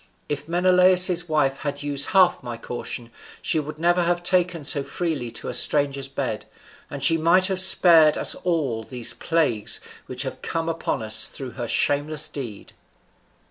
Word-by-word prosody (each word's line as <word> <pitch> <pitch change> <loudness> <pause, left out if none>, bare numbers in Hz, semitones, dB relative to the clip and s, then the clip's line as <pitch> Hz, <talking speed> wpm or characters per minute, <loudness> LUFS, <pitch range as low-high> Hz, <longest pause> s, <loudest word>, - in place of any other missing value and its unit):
If 145 0 -5
Menelaus's 180 0 +4
wife 140 -3 0
had 145 -1 -5
used 140 -1 -2
half 185 -2 +3
my 120 -2 -7
caution, 120 0 -7 0.3
she 160 - -1
would 150 0 -7
never 175 +2 +1
have 175 0 -1
taken 180 -2 0
so 140 0 +3
freely 140 -2 -4
to - - -7
a - - -4
stranger's 140 -2 +2
bed; 130 -5 -5 0.4
and 140 -1 -6
she 165 +3 +3
might 175 +4 +3
have 190 -1 -1
spared 170 -4 +5
us - - 0
all 150 -11 -2
these 120 +1 -1
plagues 150 -11 -1 0.3
which 130 +2 -4
have 130 - -7
come 165 -1 -4
upon 165 -8 -3
us 110 0 +2
through 130 -3 -7
her 120 -2 -6
shameless 145 +5 0
deed." 120 -8 -8
150 Hz, 165 wpm, -22 LUFS, 135-175 Hz, 0.4 s, spared